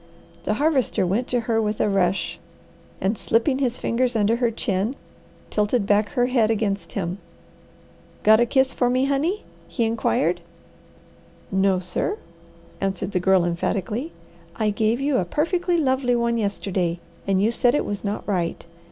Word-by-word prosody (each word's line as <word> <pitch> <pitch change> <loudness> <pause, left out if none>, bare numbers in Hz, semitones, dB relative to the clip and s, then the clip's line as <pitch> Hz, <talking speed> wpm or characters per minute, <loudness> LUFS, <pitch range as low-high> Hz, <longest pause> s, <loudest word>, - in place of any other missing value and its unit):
The 210 - +1
Harvester 275 - +1
went 210 +8 0
to 245 -1 0
her 225 0 +1
with 210 -1 -2
a - - +2
rush, 195 -2 0 0.6
and 195 +4 0
slipping 245 +6 +1
his 250 -3 0
fingers 245 +1 0
under 220 +1 +2
her 240 -1 +2
chin, 215 +1 -1 0.6
tilted 210 +1 +1
back 205 +1 +2
her 245 -3 +2
head 245 -4 +2
against 205 -5 -1
him. 180 0 -3 1.0
"Got 220 +1 +6
a 240 - +3
kiss 265 +1 +2
for 245 - +1
me, 255 +2 +2
honey?" 300 +9 0 0.2
he 235 - -1
inquired. 180 - +1 1.1
"No 190 0 +3
sir," 185 - -2 0.6
answered 195 0 -2
the 185 - +1
Girl 185 -1 +3
emphatically. 205 - -2 0.4
"I 215 -2 +1
gave 220 +3 +1
you 275 -1 +1
a - - +2
perfectly 345 - 0
lovely 260 -4 +2
one 235 0 +1
yesterday, 190 -4 -1 0.3
and 195 -1 +2
you 215 +4 +3
said 245 +2 +2
it - - 0
was 205 -1 -4
not 205 0 -3
right. 175 -6 -1
220 Hz, 160 wpm, -23 LUFS, 195-250 Hz, 1.1 s, Got